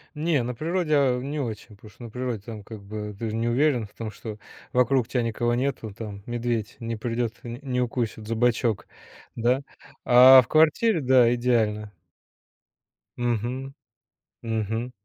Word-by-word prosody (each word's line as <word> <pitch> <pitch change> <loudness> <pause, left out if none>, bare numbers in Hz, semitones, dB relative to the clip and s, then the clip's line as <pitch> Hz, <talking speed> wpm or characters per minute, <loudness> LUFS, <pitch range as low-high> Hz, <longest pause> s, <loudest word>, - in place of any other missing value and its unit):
Не, 150 -4 +1
на 125 +1 -3
природе, 165 +2 -1
а, 130 -3 +2
не 145 +3 -4
очень, 110 -5 -5
потому 105 +1 -15
что 120 +4 -16
на 115 - -8
природе 125 -3 -3
там 110 -3 -8
как 110 -2 -10
бы, 105 0 -6
ты 110 +1 -4
же 110 - -3
не 115 +1 -1
уверен 125 -2 +2
в - - -23
том, 115 -2 -5
что 105 +1 -8 0.3
вокруг 125 0 +3
тя 125 +1 -1
никого 120 +1 0
нету, 125 -5 -2
там, 100 -2 -8
медведь 120 -2 -2
не 115 -1 -3
придет, 115 +1 -2
не 120 +1 -7
не 125 -2 -1
укусит 115 -3 -2
за 115 - -2
бочок, 115 -2 +1 0.5
да. 125 +4 +1 0.4
А 130 +1 +9
в 120 - -13
квартире- 160 +5 +3
да, 125 -3 +5
идеально. 110 -4 0 1.3
Мгм. 120 +3 -2 0.7
Мгм. 115 +2 -2
120 Hz, 165 wpm, -25 LUFS, 110-130 Hz, 1.3 s, А